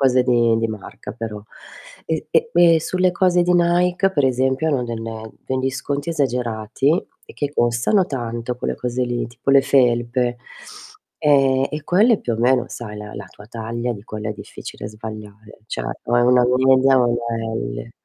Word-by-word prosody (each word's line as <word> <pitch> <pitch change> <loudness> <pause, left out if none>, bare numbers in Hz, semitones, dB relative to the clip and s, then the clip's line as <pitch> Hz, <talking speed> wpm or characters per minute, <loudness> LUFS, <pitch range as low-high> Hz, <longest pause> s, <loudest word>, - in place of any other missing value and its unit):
cose 130 -2 +4
di 115 -2 +2
marca 110 -2 -8
però. 110 -2 -6 0.6
E 160 -1 -3
e 165 +8 +2
e 170 -2 +6
sulle 185 +2 +1
cose 180 -1 +3
di 180 +1 +2
Nike, 180 +2 +2
per 145 -6 +1
esempio, 130 +4 +1
hanno 140 -5 +1
del 115 -1 -5 0.4
degli 130 0 -1
sconti 140 +3 -4
esagerati 125 -4 -1 0.4
e - - -12
che 145 -1 -3
costano 120 - +2
tanto 120 -2 -4
quelle - - -3
cose 125 0 -3
lì, 120 -1 -2
tipo 120 +3 -3
le 135 0 +7
felpe, 120 -2 +2 0.8
ehm, 135 -2 +3
e 150 -1 -5
quelle 210 +5 +4
più 120 - -3
o - - -1
meno 125 +1 +3
sai 105 -3 -7
la 105 0 -8
la 100 -1 -7
tua 105 - -15
taglia 115 +1 -4
di 100 -3 -10
quella 110 0 -5
è - - -2
difficile 105 0 -9
sbagliare, 110 -1 -10
cioè - - -4 0.2
o 120 - +1
è 120 - +4
una 125 0 +5
media 130 0 +4
o 120 - +3
una 115 -1 -2
L. - - -5
125 Hz, 175 wpm, -21 LUFS, 115-140 Hz, 0.8 s, le